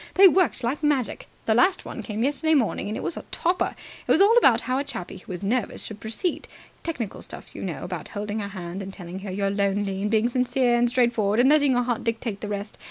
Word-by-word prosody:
They 390 +1 +9
worked 340 - +2
like 255 +6 -1
magic. 290 -6 0 0.2
The 220 - +3
last 365 - +3
one - - -6
came 215 0 -3
yesterday 295 +4 +2
morning, 240 -8 +1
and 215 - -3
it - - -5
was - - -3
a - - -4
topper! 355 +2 0 0.3
It - - +2
was - - +5
all 410 +4 +6
about 480 - +5
how 255 +1 -1
a - - 0
chappie 220 -10 -6
who 185 - -11
was 180 +1 -5
nervous 225 +2 -1
should 215 -1 -7
proceed. 225 - -3 0.3
Technical 250 - -4
stuff, - - -7
you - - -8
know, 165 -8 -4
about 180 -3 -5
holding 210 +1 -4
her 200 - -3
hand 185 -1 -6
and 195 0 -6
telling 180 -1 -8
her 195 0 -7
you're 195 +1 -1
lonely 200 -1 0
and 210 - 0
being 220 +1 +3
sincere 250 0 +2
and 240 0 +3
straightforward 235 -4 +2
and 255 +2 +6
letting 290 -3 +4
your 245 0 +2
heart 240 -2 -2
dictate 230 -3 -2
the 210 - -4
rest. 205 0 -5
225 Hz, 240 wpm, -25 LUFS, 200-265 Hz, 0.3 s, They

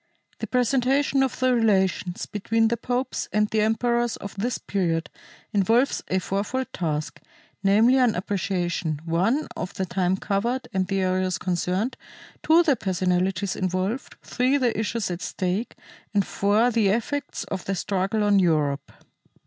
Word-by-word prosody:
The - - -4
presentation 265 +2 +2
of 265 -2 -1
the 255 0 +3
relations 190 -6 +1
between 225 +2 +1
the 235 - +1
popes 250 +2 -2
and 210 0 +2
the 215 0 0
emperors 235 +2 +1
of 200 - -8
this 230 +5 -1
period 170 -4 -1 0.4
involves 225 +7 +2
a 185 - 0
fourfold 200 +8 -2
task, 155 -3 -3 0.4
namely 215 +6 +4
an 245 -4 +3
appreciation 180 -4 -2
(1) 190 - +1
of 180 +3 -5
the 190 - -1
time 185 +1 0
covered 230 +7 -1
and 190 -1 0
the 195 0 0
areas 185 0 0
concerned, 185 +6 -1 0.4
(2) 330 +2 +5
the 295 -5 +3
personalities 185 -1 0
involved, 185 +6 -2
(3) 255 +3 +1
the 250 -4 +1
issues 220 -2 -2
at 175 +1 -4
stake, 190 +5 -2 0.4
and 200 -2 +3
(4) 210 +5 +2
the 225 -3 +2
effects 235 +8 -1
of 185 - -5
the 195 - -1
struggle 195 +3 -1
on 205 -1 +4
Europe. 150 -6 +1
200 Hz, 150 wpm, -25 LUFS, 185-240 Hz, 0.4 s, 2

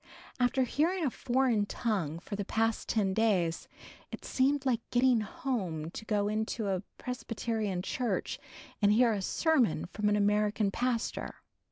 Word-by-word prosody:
After 250 +1 +3
hearing 325 +7 +1
a 265 - +1
foreign 240 -5 +1
tongue 190 - -1
for 180 +4 -6
the 205 - -2
past 225 +2 0
ten 200 -4 +1
days, 190 -7 +1 0.4
it - - -8
seemed 275 +1 +1
like 245 -4 +2
getting 245 -1 +4
home 190 - -3
to 220 - -8
go 205 -2 +1
into 215 0 -1
a 185 -2 0 0.2
Presbyterian 225 -6 -3
church 245 +3 -2 0.4
and 205 0 +5
hear 230 +1 +4
a 200 - -2
sermon 255 - +2
from 210 +3 -1
an 210 - +3
American 210 0 +2
pastor. 240 +1 -2
220 Hz, 150 wpm, -31 LUFS, 205-250 Hz, 0.4 s, and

